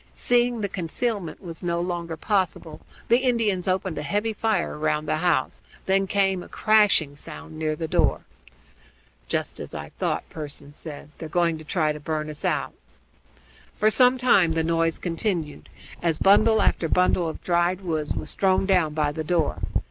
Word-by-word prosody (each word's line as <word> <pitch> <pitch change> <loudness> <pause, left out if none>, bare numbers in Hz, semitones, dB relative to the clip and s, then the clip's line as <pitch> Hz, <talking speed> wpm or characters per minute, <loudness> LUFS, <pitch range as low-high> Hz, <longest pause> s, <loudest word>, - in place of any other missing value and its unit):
Seeing 240 -1 +2
that 200 -2 -3
concealment 195 +1 -3
was 165 -2 -7
no 170 -1 -1
longer 170 -2 -3
possible, 185 -4 -1 0.3
the 235 +2 +5
Indians 225 -8 +1
opened 185 -4 -1
a - - -3
heavy 205 +9 -1
fire 220 +1 0
round 150 0 -1
the 155 - +1
house; 165 -5 0 0.2
then 195 0 +2
came 195 -2 +1
a - - -10
crashing 210 -9 +3
sound 160 +2 -10
near 155 -1 -1
the 160 +1 -4
door. - - +2 1.1
"Just - - -3
as - - -8
I - - -6
thought," - - -1
Pearson 145 -2 -7
said. 150 0 -9
"They're 160 - -6
going 170 -1 +1
to - - -10
try 155 -1 0
to 150 - -8
burn 155 0 -3
us 150 - -7
out." - - -1 1.0
For 215 +1 +3
some 250 +2 +5
time 195 -10 +4
the 160 0 0
noise 165 0 +1
continued, 165 -4 -3 0.3
as 165 -3 +1
bundle 215 +3 +5
after 165 - +1
bundle 180 -1 +2
of - - -8
dried 175 +1 +1
wood 160 -5 -2
was 150 - -4
thrown 190 0 +2
down 180 -6 +2
by 150 -2 +1
the 155 +2 -4
door. 165 -1 0
170 Hz, 170 wpm, -24 LUFS, 155-195 Hz, 1.1 s, the